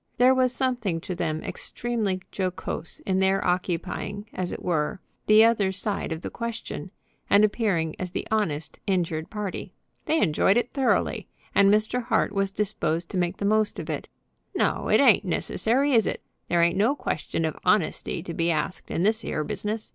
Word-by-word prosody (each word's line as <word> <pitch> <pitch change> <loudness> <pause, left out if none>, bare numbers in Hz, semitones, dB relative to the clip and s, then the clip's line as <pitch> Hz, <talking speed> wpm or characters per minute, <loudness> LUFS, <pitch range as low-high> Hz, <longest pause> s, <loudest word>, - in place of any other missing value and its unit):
There 250 +2 +6
was 255 -1 +3
something 245 -9 -1
to 180 - -4
them 155 -3 -2
extremely 215 -6 -2
jocose 185 -3 -4
in 190 -1 0
their 190 0 +2
occupying, 185 +3 -2
as 180 -1 -3
it - - -6
were, 170 +2 0 0.3
the 215 +1 +8
other 215 -4 +3
side 200 -1 -3
of 160 0 -3
the - - -4
question, 235 -1 -5 0.4
and 205 +1 +6
appearing 195 -8 0
as 185 - -3
the - - -4
honest, 160 -9 -1
injured 170 -4 0
party. 210 -3 -5 0.3
They 320 0 +2
enjoyed 190 - +3
it 240 0 -1
thoroughly, 270 -3 +1 0.3
and 200 0 +5
Mr. 215 +4 +2
Hart 245 - +1
was 195 -1 0
disposed 180 -4 -1
to 185 - -1
make 175 +1 -1
the 200 - -3
most 215 +1 +2
of - - -4
it. - - -5 0.5
"No; - - 0
it - - +4
ain't - - +6
necessary; 270 +5 +1
is 225 -4 +4
it? - - -3 0.2
There 170 -1 +3
ain't 170 +1 +2
no 225 +8 +3
question 165 - -2
of 155 - -2
honesty 170 -4 +1
to 170 - -6
be 165 +1 0
asked 160 +3 -2
in 170 - -1
this 220 +2 +2
'ere 155 - -2
business. 215 +7 -4
195 Hz, 180 wpm, -26 LUFS, 170-220 Hz, 0.5 s, the